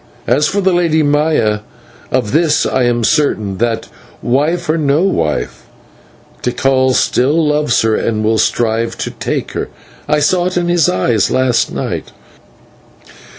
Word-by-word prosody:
As 140 Hz, +6 st, +2 dB
for 200 Hz, +6 st, -1 dB
the 190 Hz, -1 st, +2 dB
Lady 165 Hz, -3 st, +2 dB
Maya, 145 Hz, -7 st, +1 dB, 0.5 s
of 125 Hz, -5 st, 0 dB
this 155 Hz, 0 st, +2 dB
I 130 Hz, -2 st, +1 dB
am 120 Hz, -1 st, 0 dB
certain, 110 Hz, -, 0 dB
that 115 Hz, -1 st, -1 dB, 0.4 s
wife 150 Hz, +8 st, 0 dB
or 155 Hz, -, +1 dB
no 150 Hz, +1 st, +1 dB
wife 80 Hz, -, -2 dB, 0.7 s
Tikal 130 Hz, +1 st, +1 dB
still 150 Hz, +6 st, +2 dB
loves 150 Hz, -5 st, +1 dB
her 110 Hz, -1 st, +2 dB
and 110 Hz, -2 st, -1 dB
will 110 Hz, 0 st, +1 dB
strive 115 Hz, +1 st, 0 dB
to -, -, -4 dB
take -, -, -4 dB
her; -, -, -4 dB, 0.4 s
I 150 Hz, 0 st, +2 dB
saw 175 Hz, +4 st, +1 dB
it 185 Hz, -, -3 dB
in 175 Hz, 0 st, 0 dB
his 175 Hz, -2 st, +3 dB
eyes 95 Hz, +3 st, +1 dB
last 130 Hz, -2 st, +1 dB
night. -, -, -4 dB
135 Hz, 150 wpm, -15 LUFS, 115-155 Hz, 0.7 s, his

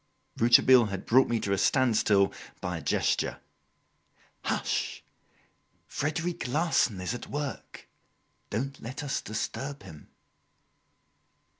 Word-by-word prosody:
Rouletabille 120 Hz, +1 st, +6 dB
had 100 Hz, -2 st, -5 dB
brought 130 Hz, +3 st, +5 dB
me 120 Hz, -1 st, 0 dB
to 100 Hz, -, -1 dB
a 100 Hz, -, 0 dB
standstill 110 Hz, -6 st, +3 dB, 0.3 s
by 90 Hz, -2 st, -3 dB
a -, -, -9 dB
gesture. -, -, 0 dB, 1.1 s
"Hush! -, -, -2 dB, 0.8 s
Frederic 160 Hz, -1 st, -3 dB
Larsan 135 Hz, -, +1 dB
is 90 Hz, +5 st, -3 dB
at 120 Hz, -, -7 dB
work! 145 Hz, -1 st, -6 dB, 0.6 s
Don't 135 Hz, +6 st, -3 dB
let 130 Hz, +5 st, -6 dB
us 140 Hz, -, -2 dB
disturb 135 Hz, +6 st, -5 dB
him!" 75 Hz, -2 st, -13 dB
120 Hz, 110 wpm, -28 LUFS, 105-140 Hz, 1.1 s, Rouletabille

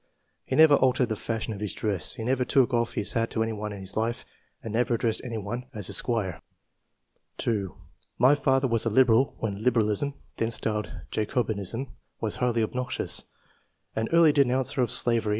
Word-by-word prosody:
He -, -, -2 dB
never 160 Hz, -1 st, +7 dB
altered 130 Hz, -1 st, +2 dB
the 110 Hz, -, -1 dB
fashion 110 Hz, +1 st, -3 dB
of 100 Hz, -, -8 dB
his 105 Hz, -2 st, -3 dB
dress; 100 Hz, -7 st, -1 dB
he 110 Hz, -, -6 dB
never 125 Hz, +2 st, +1 dB
took 130 Hz, 0 st, +3 dB
oflF 120 Hz, -1 st, 0 dB
his 105 Hz, 0 st, -3 dB
hat 115 Hz, 0 st, 0 dB
to 110 Hz, -, 0 dB
anyone 105 Hz, -1 st, -4 dB
in 100 Hz, -1 st, -7 dB
his 95 Hz, 0 st, -7 dB
life, 115 Hz, +2 st, -1 dB, 0.4 s
and 110 Hz, -, -5 dB
never 120 Hz, +1 st, +1 dB
addressed 115 Hz, -1 st, 0 dB
anyone 120 Hz, +1 st, -5 dB
as 105 Hz, -2 st, -4 dB
Esq." 100 Hz, -, +2 dB, 1.3 s
2. 100 Hz, -6 st, -2 dB, 0.4 s
"My 130 Hz, +4 st, +6 dB
father 135 Hz, -2 st, +2 dB
was 115 Hz, -2 st, +1 dB
a 115 Hz, -, +1 dB
Liberal 125 Hz, +2 st, +4 dB
when 100 Hz, -2 st, -4 dB
Liberalism 120 Hz, +3 st, +2 dB, 0.2 s
(then 115 Hz, -, 0 dB
styled 105 Hz, -2 st, -2 dB, 0.2 s
Jacobinism) 110 Hz, +2 st, -2 dB, 0.3 s
was 110 Hz, -2 st, -2 dB
h'^^^" 120 Hz, -2 st, +1 dB
obnoxious, 125 Hz, +3 st, -3 dB, 0.7 s
an 110 Hz, 0 st, -1 dB
early 165 Hz, -2 st, +6 dB
denouncer 130 Hz, -2 st, +2 dB
of 120 Hz, -, +1 dB
slavery 120 Hz, +1 st, +2 dB
II.] -, -, 0 dB
QUALITIES. 110 Hz, -, -3 dB
115 Hz, 180 wpm, -27 LUFS, 110-125 Hz, 1.3 s, never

